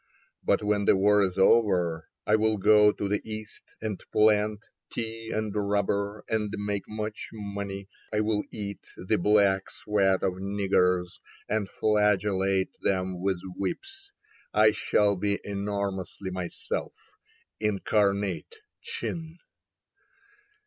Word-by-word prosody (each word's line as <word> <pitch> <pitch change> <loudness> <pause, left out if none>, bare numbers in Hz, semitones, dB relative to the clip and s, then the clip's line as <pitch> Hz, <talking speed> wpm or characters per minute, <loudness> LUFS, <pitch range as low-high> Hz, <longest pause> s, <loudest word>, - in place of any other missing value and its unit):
But - - +2
when 105 -1 +1
the - - +5
war 105 +1 +4
is 95 -1 0
over, 95 -6 +3 0.2
I 105 - +4
will 110 0 +2
go 105 +1 +6
to 100 - -3
the 105 +1 0
East 110 0 -9
and 110 -3 -4
plant 105 0 +3 0.3
Tea 115 -1 -4
and 110 -1 -2
rubber, 100 0 0
and 105 -2 -1
make 100 -1 -3
much 105 0 -5
money. 100 -2 -5 0.2
I 105 - +1
will 105 -1 +1
eat 100 -2 -6 0.2
the 90 - 0
black 100 0 +3
sweat 95 -3 +1
of 95 -1 0
niggers 95 -2 +1 0.3
And 110 -3 -1
flagellate 100 -2 +1
them 95 -2 -1
with 95 -2 0
whips. 390 - -5 0.4
I 110 0 +6
shall 105 -1 +2
be 100 +1 0
enormously 100 -1 -3
myself, 90 -2 -4 0.6
Incarnate 105 - 0 0.2
Chin." 170 - -5
105 Hz, 120 wpm, -27 LUFS, 95-105 Hz, 0.6 s, go